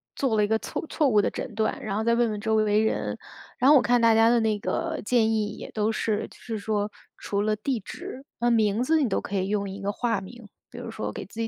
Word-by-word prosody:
做 260 -5 0
了 210 - +3
一 - - +2
个 220 +1 +2
错 - - -5
错 300 -4 +2
误 210 -4 +4
的 - - +1
诊 245 - -6
断， 215 0 0
然 200 -2 -3
后 220 - 0
再 235 0 +3
问 235 -1 +2
问 210 - -4
周 220 +1 0
围 215 0 +3
人， 220 - -1 0.4
然 255 - +5
后 300 - +8
我 - - +5
看 245 0 +2
大 230 -1 +5
家 225 +1 +5
的 240 0 +4
那 220 -2 +1
个 - - -2
建 225 -2 +3
议 215 -1 +1
也 - - -8
都 215 0 0
是， 215 -1 -1
就 - - -17
是 225 -2 -5
说 210 0 -1 0.3
除 200 0 -2
了 215 +1 +1
地 235 +3 -2
址， 260 +6 -8 0.2
那 240 0 +2
名 220 -1 +2
字 320 +4 +3
你 265 - +2
都 - - 0
可 205 - -5
以 190 -1 0
用 200 -1 -1
一 195 +1 -7
个 200 - -1
化 225 -2 -1
名。 230 +3 -11 0.2
比 - - -12
如 - - -6
说 - - -4
给 - - -6
自 225 - -12
己 230 - 0
220 Hz, 300 characters per minute, -26 LUFS, 210-235 Hz, 0.4 s, 后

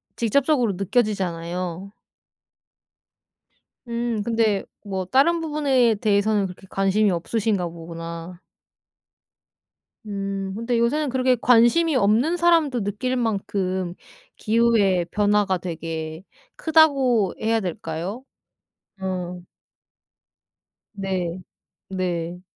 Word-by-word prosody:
직접적으로 250 -1 +2
느껴지잖아요. 185 -3 -2 2.0
음 235 -2 -2
근데 225 -3 +1 0.2
뭐 190 -2 -3
다른 285 - +3
부분에 275 -7 +2
대해서는 205 0 +2
그렇게 185 +1 -9
관심이 195 +2 +2
없으신가 195 +1 -1
보구나. 165 +1 -8 1.7
음 195 -1 -3
근데 230 +1 -1
요새는 285 +5 +1
그렇게 255 0 +2
관심이 245 +7 +4
없는 245 +9 +3
사람도 325 -8 +3
느낄 210 +6 -2
만큼 195 -6 -1 0.4
기후의 215 -6 +2
변화가 205 -2 +2
되게 160 -1 -5 0.3
크다고 275 - +3
해야 225 +1 +1
될까요? 180 +4 -5 0.8
어. 180 -2 -4 1.5
네. 185 -3 -3 0.5
네. 180 -2 -3
205 Hz, 205 characters per minute, -23 LUFS, 180-240 Hz, 2.0 s, 관심이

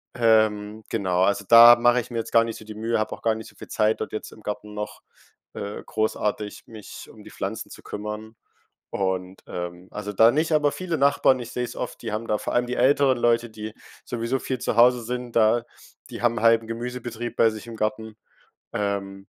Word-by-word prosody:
Ähm, 110 -2 +2
genau, 90 -2 +1
also, 100 +1 +1
da 120 +1 +10
mache 120 +1 +4
ich 120 - -13
mir 120 - -4
jetzt 115 - -5
gar 115 - +6
nicht 115 -1 -5
so 110 - -13
die 110 0 -9
Mühe, 115 +1 -1
habe 110 - -2
auch - - -21
gar 115 -1 +1
nicht 110 - -8
so - - -22
viel - - -12
Zeit 110 0 +1
dort - - -4
jetzt 110 - -5
im 110 - -15
Garten 105 0 -5
noch, 105 0 -6 0.5
äh, 100 0 -6
großartig, 105 -1 -2
mich 110 -3 -11
um - - -15
die - - -13
Pflanzen - - -5
zu - - -11
kümmern. 105 +2 -6 0.6
Und, 95 -1 -2
ähm, 90 +1 -6
also, 105 0 -5
da 110 +3 +6
nicht 155 +3 0
aber 150 -1 +3
viele 175 -3 -3
Nachbarn, 140 -2 +3
ich 120 -1 -7
sehe 125 - -2
es - - -7
oft, - - -5
die 115 -2 -4
haben 110 +2 -4
da 105 - +2
vor - - -4
allem 120 0 +2
die 125 +1 -3
älteren 135 -1 +3
Leute, 120 0 +2
die 110 0 -8 0.3
sowieso 120 +2 -2
viel 130 0 -3
zu 115 - -2
Hause 120 +1 +5
sind 125 0 -5
da, 115 +1 +4 0.5
die - - -7
haben 120 -1 +2
'n - - -6
halben 115 -1 +4
Gemüsebetrieb 120 0 -5
bei 115 - +5
sich 110 +1 -9
im 115 -1 -8
Garten, 110 0 -3 0.6
ähm, 100 -1 -3
110 Hz, 215 wpm, -24 LUFS, 105-120 Hz, 0.6 s, da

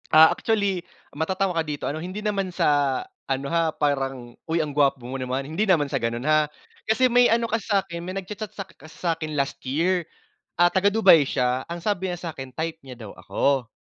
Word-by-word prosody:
Ah, 160 +1 +9
actually, 200 -5 0 0.3
matatawa 185 +4 -1
ka 165 - +1
dito, 150 -2 -4
ano, 155 +3 -3
hindi 185 +3 -5
naman 200 -3 -1
sa 145 -5 +2 0.3
ano 135 +1 -1
ha, 165 +1 +1
parang, 135 -5 -2
"Uy, 165 0 -1
ang 150 -3 -2
gwapo 140 -2 +3
mo 130 - -5
naman." 130 +1 -3
hindi 160 +8 -1
naman 175 -8 +3
sa 140 -3 -2
ganun 120 +4 -2
ha. 155 -1 +3 0.3
Kasi 240 +4 +3
may 245 -1 +4
ano 230 0 +2
kasi 225 -1 -3
sakin, 190 -4 0
may 180 - -5
nagcha-chat 210 +2 -7
sak 195 -2 -9
kasi 155 - -15
sakin 160 -4 -2
last 140 - 0
year. 170 +7 +1 0.6
Ah, 175 - +7
taga-Dubai 195 -3 +5
siya, 125 0 0
ang 170 +1 -5
sabi 190 -2 -1
niya 175 - -5
sakin, 140 -7 -7
type 160 0 -3
nya 130 -2 -10
daw 110 -4 -9
ako. 135 -4 0
160 Hz, 195 wpm, -24 LUFS, 140-190 Hz, 0.6 s, Ah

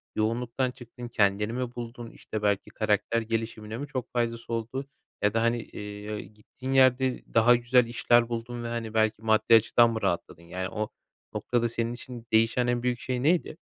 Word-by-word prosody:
yoğunluktan 120 +3 0
çıktın, 120 0 -10
kendini 105 0 +1
mi 125 -1 -3
buldun? 120 -1 -7
İşte, 110 - -6
belki, 100 -1 +1
karakter 110 +1 +1
gelişimine 110 -1 -3
mi 145 +2 -5
çok 130 -3 -5
faydası 115 -1 -2
oldu 120 +4 -3 0.4
ya 105 0 +2
da, 115 - +2
hani, 115 0 +1
eee 105 +1 -7
ı - - -4
gittiğin 120 +5 -8
yerde 130 -1 +4
daha 120 +2 +6
güzel 120 0 +3
işler 120 0 +3
buldun 120 +1 -4
ve, - - -3
hani, 115 -2 -4
belki, 110 -1 +2
maddi 110 +1 +4
açıdan 115 +1 +5
mı 110 -1 -3
rahatladın? 85 -3 -2
Yani, 90 +2 -4
o 110 0 -3 0.4
noktada 120 -1 0
senin 115 +1 -2
için 120 -1 -9
değişen 115 +2 +3
en 120 0 0
büyük 125 -1 0
şey 125 0 -2
neydi? 165 0 +2
115 Hz, 180 wpm, -28 LUFS, 110-120 Hz, 0.4 s, daha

